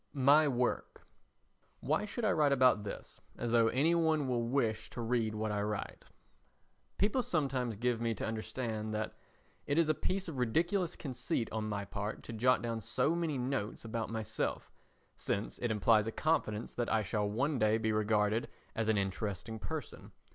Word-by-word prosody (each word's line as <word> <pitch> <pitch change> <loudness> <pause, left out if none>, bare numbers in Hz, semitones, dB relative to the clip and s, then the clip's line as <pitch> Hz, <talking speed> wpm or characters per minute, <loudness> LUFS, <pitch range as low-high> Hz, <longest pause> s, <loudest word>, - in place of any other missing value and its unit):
My 145 +3 +5
Work 125 -2 -1 0.8
Why 155 +9 0
should 225 +2 -3
I 205 - +4
write 150 -2 +3
about 130 -5 +4
this 100 - -8 0.2
as 120 -1 -2
though 115 -1 +5
any 140 +8 +3
one 160 -4 +2
will 125 -2 +1
wish 115 -4 0
to - - -8
read 115 -2 0
what 110 0 -1
I 105 0 0
write? 105 0 -4 0.9
People 210 +6 +2
sometimes 135 - -1
give 120 +2 0
me 115 -1 0
to - - -3
understand 110 -1 -3
that 110 0 -2 0.5
it 145 - +1
is 165 -2 +4
a - - +5
piece 185 +5 -2
of 150 -6 -5
ridiculous 170 - +1
conceit 125 -4 -3
on 110 -1 -2
my 100 -1 -2
part 100 +3 -4
to 115 - -7
jot 125 +2 +3
down 115 -1 -2
so 130 +8 +1
many 165 -4 -1
notes 125 -4 -2
about 115 0 -3
myself, 110 -2 -3 0.5
since 100 +2 -2
it 120 - -1
implies 110 0 +4
a - - -1
confidence 115 -8 0
that 120 -1 -2
I 110 -1 +3
shall 105 +1 -1
one 135 +6 0
day 110 +1 +4
be 110 -1 0
regarded 105 +1 +2 0.3
as 110 -1 0
an 110 - +3
interesting 100 +2 -3
person. 155 +3 -6
115 Hz, 175 wpm, -33 LUFS, 110-140 Hz, 0.9 s, My